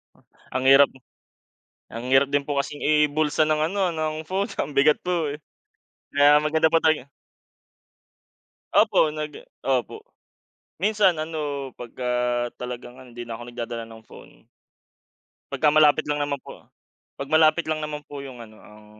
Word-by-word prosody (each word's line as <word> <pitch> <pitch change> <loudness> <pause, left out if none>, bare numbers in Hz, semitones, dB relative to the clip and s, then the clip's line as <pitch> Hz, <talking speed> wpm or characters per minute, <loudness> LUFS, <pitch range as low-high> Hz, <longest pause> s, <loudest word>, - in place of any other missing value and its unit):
Oh, - - -27 0.3
ang 130 0 -1
hirap 135 +1 +7 1.0
ang 115 +2 -7
hirap 135 +1 +5
din 140 0 0
po 145 -1 -3
kasing 145 +1 -6
ibulsa 150 0 +2
ng 155 0 +1
ano 195 -3 +1
ng 155 -2 -2
phone 195 +2 -1
ang 145 0 -4
bigat 145 +2 +4
po, 170 -5 -1
eh. 150 - -9 0.7
Kaya 145 +1 +6
maganda 155 +1 +2
po 165 - +4
tay 155 -4 +2
eh 140 - -22 1.6
Opo, 155 - +4
nag 150 -1 -6 0.3
opo. 130 -2 -1 0.8
Minsan 205 -3 +3
ano, 145 -4 -4
'pagka 125 +1 -5 0.5
talagang 125 0 -7
ano 125 -2 -14
hindi 120 - -6
na 115 -1 -7
ako - - -9
nagdadala 120 -1 -6
ng 110 0 -13
phone. - - -17 1.1
'Pagka 155 - +1
malapit 155 0 +4
lang 150 0 0
naman 140 -1 -3
po. - - -13 0.6
'Pag 140 - -4
malapit 155 +1 +3
lang 155 -1 -2
naman 150 -1 -4
po 140 -1 -8
yung 130 -3 -10
ano 110 -2 -12
ang 105 0 -16
145 Hz, 155 wpm, -24 LUFS, 130-155 Hz, 1.6 s, hirap